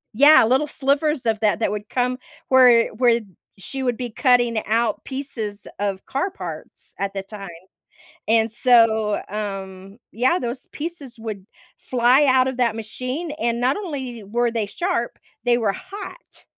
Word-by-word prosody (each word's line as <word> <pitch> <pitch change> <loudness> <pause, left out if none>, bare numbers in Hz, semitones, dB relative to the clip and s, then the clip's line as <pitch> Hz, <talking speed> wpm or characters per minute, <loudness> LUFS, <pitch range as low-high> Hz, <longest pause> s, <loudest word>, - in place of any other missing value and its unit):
Yeah, 290 +4 +8
little 260 +6 +2
slivers 280 0 0
of 220 -2 +1
that 215 -1 +2
that 230 - 0
would 210 0 -5
come 250 0 0 0.3
where 250 -3 +6
where 235 0 +3 0.4
she 265 +8 -6
would 245 -3 0
be 245 -1 -4
cutting 240 -2 +2
out 225 0 0
pieces 230 -7 -6
of 200 -2 -2
car 280 +9 -2
parts 390 - -9
at 200 0 -2
the 195 - -3
time. 200 -1 -9 0.8
And 225 0 +3
so, 220 -3 +3
um, 195 -1 -6
yeah, 255 +9 +2
those 245 +2 -5
pieces 295 -6 -7
would 215 -4 -7 0.3
fly 250 +3 +3
out 260 -1 +4
of 260 - -4
that 235 -3 +1
machine, 255 +9 -5
and 235 0 0
not 255 +2 +2
only 265 - -6
were 235 +4 0
they 225 -2 -2
sharp, 240 - -2 0.3
they 240 -1 +3
were 215 -4 +1
hot. 405 - -10
240 Hz, 155 wpm, -22 LUFS, 215-265 Hz, 0.8 s, Yeah